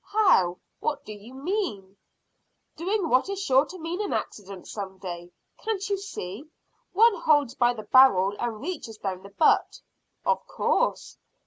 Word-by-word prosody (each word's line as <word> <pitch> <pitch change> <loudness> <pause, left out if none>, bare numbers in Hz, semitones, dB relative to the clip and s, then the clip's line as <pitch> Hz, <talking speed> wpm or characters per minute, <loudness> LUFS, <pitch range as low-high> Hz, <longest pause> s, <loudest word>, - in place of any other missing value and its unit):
"How? 365 - +3 0.2
What 295 -2 -2
do 215 - -7
you 215 +5 -12
mean?" 265 - -3 0.8
"Doing 370 +3 -1
what 260 +5 +2
is 395 -1 -3
sure 275 -6 +3
to 370 - -9
mean 340 +3 -4
an 415 - -2
accident 195 -3 -5
some 195 -2 -6
day. 175 -2 -7 0.3
Can't 430 -3 -2
you - - +3
see, 275 - -7 0.4
one 455 +4 +5
holds 290 -5 +3
by 245 -2 +2
the 215 - -7
barrel 205 -8 +5
and 235 -3 -3
reaches 285 -9 -5
down 190 -3 -4
the 195 - -12
butt?" 205 +10 +2 0.5
"Of 475 - 0
course." - - 0
260 Hz, 155 wpm, -26 LUFS, -, 0.8 s, one